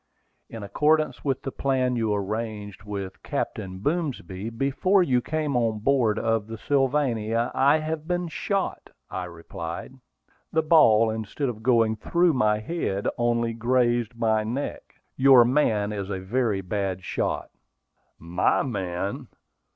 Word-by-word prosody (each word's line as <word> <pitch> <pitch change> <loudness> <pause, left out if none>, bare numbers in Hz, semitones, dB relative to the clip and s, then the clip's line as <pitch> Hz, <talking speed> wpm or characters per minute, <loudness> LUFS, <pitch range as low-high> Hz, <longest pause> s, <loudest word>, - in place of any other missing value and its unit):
"In 115 -2 -7
accordance 155 +10 +1
with 135 -2 -1
the 135 - -3
plan 130 -2 0
you 115 -2 0
arranged 105 -1 -3
with 100 -2 -6
Captain 95 -1 -4
Boomsby 110 - -3
before 140 - +2
you 125 -6 +2
came 150 0 -2
on 115 -3 +1
board 115 -1 +2
of 115 -2 0
the 115 0 -6
Sylvania, 125 -5 0
I 140 +3 +4
have 155 0 -4
been 175 -1 -1
shot," 195 +4 -2 0.2
I 90 - -3
replied. 85 +3 -7 0.6
"The 160 -1 +2
ball, 115 -9 +5
instead 110 +5 -3
of 110 -3 -6
going 115 -2 +3
through 170 +9 +2
my 105 -5 +2
head, 110 - -2
only 120 -1 +1
grazed 120 0 +1
my 110 -2 +2
neck. 120 +6 -5 0.2
Your 130 -2 +7
man 110 -6 +1
is 100 -2 -4
a 95 -2 -3
very 105 +1 0
bad 95 -1 -3
shot." - - -2 0.7
"My 85 +2 +1
man! 95 -5 -3
115 Hz, 135 wpm, -25 LUFS, 105-135 Hz, 0.7 s, Your